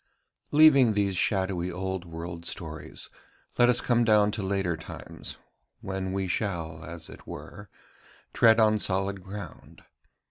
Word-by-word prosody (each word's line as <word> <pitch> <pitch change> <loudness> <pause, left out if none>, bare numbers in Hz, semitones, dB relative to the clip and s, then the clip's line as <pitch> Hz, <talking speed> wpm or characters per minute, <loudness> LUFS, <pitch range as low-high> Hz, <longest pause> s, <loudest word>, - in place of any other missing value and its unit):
Leaving 140 -6 +6
these 100 -2 +1
shadowy 95 -1 0
old 95 0 -4
world 85 0 -7
stories, 80 -3 -6 0.5
let 120 0 +6
us 120 0 +3
come 120 -1 +2
down 105 -2 +4
to 105 - -3
later 95 -3 0
times, 80 - -9 0.4
when 95 -1 -3
we 95 0 -1
shall, 85 -5 -3
as 85 0 -8
it - - -13
were, 105 -2 -9 0.6
tread 115 -1 +5
on 110 -1 +4
solid 95 0 0
ground. 100 +1 -10
95 Hz, 135 wpm, -27 LUFS, 85-105 Hz, 0.6 s, Leaving